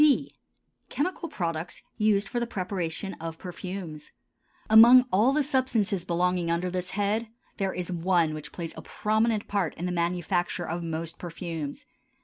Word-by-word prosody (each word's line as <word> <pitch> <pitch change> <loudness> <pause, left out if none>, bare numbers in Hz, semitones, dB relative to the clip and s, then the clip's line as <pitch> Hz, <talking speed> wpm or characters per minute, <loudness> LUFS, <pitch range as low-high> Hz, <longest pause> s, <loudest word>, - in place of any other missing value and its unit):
B. 295 -3 +3 0.6
Chemical 335 +2 -2
Products 170 - -3
used 210 -1 +2
for 240 - -2
the 235 - -1
Preparation 185 -2 -3
of 165 -1 -5
Perfumes. 180 -4 -7 0.6
Among 235 +4 +9
all 215 +7 +5
the 295 +1 +2
substances 240 - 0
belonging 180 0 +1
under 170 +2 0
this 180 0 -3
head, 210 +3 +1 0.3
there 195 -2 0
is 180 0 -4
one 170 -2 +2
which 150 -1 -7
plays 170 -2 -6
a - - -7
prominent 220 0 0
part 195 -6 -1
in 175 - -4
the 180 - -1
manufacture 175 +1 -1
of 170 +2 -3
most 165 0 -4
perfumes. 165 -4 -5
180 Hz, 150 wpm, -27 LUFS, 170-215 Hz, 0.6 s, Among